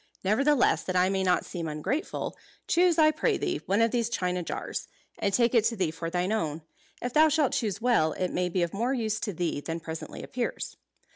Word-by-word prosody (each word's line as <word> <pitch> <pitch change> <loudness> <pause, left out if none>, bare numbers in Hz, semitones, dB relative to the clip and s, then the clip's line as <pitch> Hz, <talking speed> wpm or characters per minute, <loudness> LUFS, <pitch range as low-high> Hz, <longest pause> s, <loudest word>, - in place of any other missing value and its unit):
Nevertheless, 265 +8 +3
that 185 - -2
I 180 +1 +4
may 195 0 0
not 180 -1 +2
seem 170 -3 -5
ungrateful, 160 - -3 0.3
choose, 345 -1 +3
I 310 -1 +6
pray 310 - +1
thee, 360 -3 -2
one 200 +4 +2
of 230 0 +3
these 235 -2 0
china 180 -5 -1
jars; 170 - -4 0.3
and 200 - +1
take 235 +3 +3
it 230 -3 +5
to 230 0 +1
thee 185 -6 0
for 165 +1 -5
thine 180 +3 -1
own. 160 -8 -1 0.4
If 245 0 -2
thou 310 +1 +6
shalt 300 -3 +2
choose 210 -2 -1
well, 160 -11 +3
it 185 - -2
may 180 0 0
be 180 0 0
of 170 - -2
more 240 +6 0
use 220 -3 -1
to 210 - -2
thee 170 -4 -2
than 165 +2 -4
presently 160 0 -7
appears." 245 -1 -4
200 Hz, 215 wpm, -28 LUFS, 175-245 Hz, 0.4 s, I